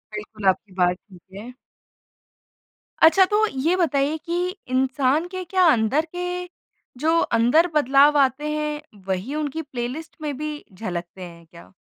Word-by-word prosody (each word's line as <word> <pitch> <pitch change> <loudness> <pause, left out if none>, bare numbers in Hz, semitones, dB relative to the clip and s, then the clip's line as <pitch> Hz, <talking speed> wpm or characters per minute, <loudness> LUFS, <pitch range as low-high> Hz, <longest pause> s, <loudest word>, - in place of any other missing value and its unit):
बिल्कुल, 210 0 -8
आपकी 190 +1 0
बात 180 0 +3
ठीक 180 -1 -19 0.2
है। 240 +4 -9 1.5
अच्छा 335 +4 +7
तो 420 +3 +2
ये 315 +2 0
बताइए 300 -4 +1
कि 350 +1 -1 0.2
इंसान 265 +4 +1
के 370 0 -6
क्या 370 +2 +2
अंदर 250 +7 +1
के 360 0 -3 0.5
जो 320 +3 +2 0.2
अंदर 250 +10 +4
बदलाव 285 +1 +5
आते 280 +2 +1
हैं, 300 0 -3 0.3
वही 190 +9 -3
उनकी 305 +1 -3
प्लेलिस्ट 275 +2 -6
में 295 -2 -3
भी 300 0 -5
झलकते 180 -2 -6
हैं 170 -1 -12
क्या? 170 +3 -16
285 Hz, 140 wpm, -23 LUFS, 225-320 Hz, 1.5 s, अच्छा